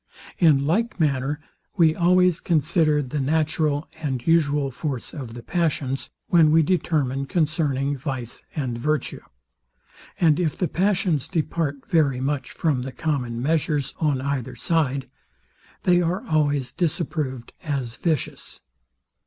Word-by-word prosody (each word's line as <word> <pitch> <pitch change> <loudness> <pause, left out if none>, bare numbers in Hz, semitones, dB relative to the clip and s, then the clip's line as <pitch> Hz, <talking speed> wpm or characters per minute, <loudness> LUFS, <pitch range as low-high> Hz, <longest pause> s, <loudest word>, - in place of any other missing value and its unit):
In 150 -5 +5
like 215 +7 0
manner 145 -1 +1 0.4
we 160 -3 +5
always 180 0 +4
consider 155 -2 +2
the 140 +3 -3
natural 150 +1 0
and 130 -6 -3
usual 145 -4 +2
force 130 -1 -4
of 125 -6 -7
the 120 - -8
passions, 145 -6 -1 0.2
when 165 -3 +5
we 160 +1 +5
determine 145 -6 0
concerning 145 -4 0
vice 130 -4 -5
and 130 -6 -2
virtue; 150 +4 -1 1.0
and 160 -2 +4
if 165 -4 0
the 180 - 0
passions 180 -5 +1
depart 155 -3 -2
very 150 -8 +2
much 135 -1 -2
from 145 -6 0
the 130 +1 -5
common 125 -6 -2
measures 150 -2 0
on 145 -5 +1
either 140 -3 -3
side, 140 -5 0 0.8
they 180 -1 +4
are 175 +2 -1
always 145 -5 +1
disapproved 150 -6 -2
as 135 -6 -3
vicious. 160 -6 -3
150 Hz, 130 wpm, -24 LUFS, 135-165 Hz, 1.0 s, In